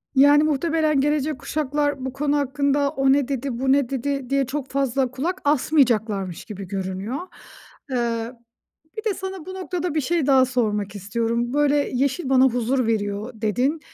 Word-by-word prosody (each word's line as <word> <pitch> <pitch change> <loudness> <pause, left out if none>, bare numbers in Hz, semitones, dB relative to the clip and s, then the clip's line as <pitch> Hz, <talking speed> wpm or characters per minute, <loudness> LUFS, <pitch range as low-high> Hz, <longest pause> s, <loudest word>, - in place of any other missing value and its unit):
Yani, 285 +2 +6
muhtemelen 310 -1 +1
gelecek 295 -1 0
kuşaklar 290 -2 -1
bu 260 - -4
konu 290 +1 0
hakkında 280 0 +1
"O 270 -2 +2
ne 280 -2 +1
dedi, 265 -2 -3
bu 265 0 +2
ne 275 -3 +3
dedi?" 275 0 -2
diye 275 0 +2
çok 270 +1 -4
fazla 270 -2 0
kulak 325 +9 -3
asmayacaklarmış 230 - +1
gibi 200 -3 -8
görünüyor. 190 +5 -4 0.7
Eee, 235 -2 -1 0.7
bir 435 - -5
de - - -1
sana 380 -3 -6
bu 375 - -7
noktada 360 -2 -3
bir 310 - +2
şey 320 +1 0
daha 265 -2 +5
sormak 210 -6 -1
istiyorum. 230 +4 -2
Böyle, 290 0 +3 0.2
"Yeşil 270 +4 0
bana 260 -1 +5
huzur 250 0 +1
veriyor." 210 +1 -2
dedin. 255 +9 +1
270 Hz, 160 wpm, -23 LUFS, 235-290 Hz, 0.7 s, Yani